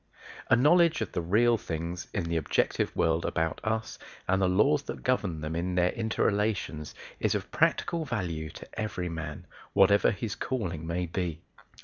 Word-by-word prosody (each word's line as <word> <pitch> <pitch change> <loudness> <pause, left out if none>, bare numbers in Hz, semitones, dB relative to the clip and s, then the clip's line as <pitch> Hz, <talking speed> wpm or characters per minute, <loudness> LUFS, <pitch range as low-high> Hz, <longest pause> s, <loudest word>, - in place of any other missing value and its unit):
A - - +7
knowledge 160 +4 +4
of 110 - -2
the - - -1
real 115 +7 +3
things 85 +1 -4
in 95 - -1
the 85 0 -2
objective 80 - 0
world 80 0 +2
about 80 -1 -1
us 110 0 -2 0.3
and 95 +1 +2
the 95 - +4
laws 135 +11 +3
that - - -6
govern 100 -11 0
them 80 +1 -3
in 90 +2 -1
their 90 0 +3
inter 110 -2 -1
relations 100 -8 -1 0.2
is - - +1
of - - -4
practical 170 -2 +1
value 90 - -3
to 80 - -10
every 90 -5 -2
man, 80 -3 -6 0.3
whatever 100 +1 +5
his 110 0 -3
calling 90 -11 -3
may 90 +2 -1
be. 85 -1 -3
90 Hz, 170 wpm, -29 LUFS, 85-110 Hz, 0.3 s, A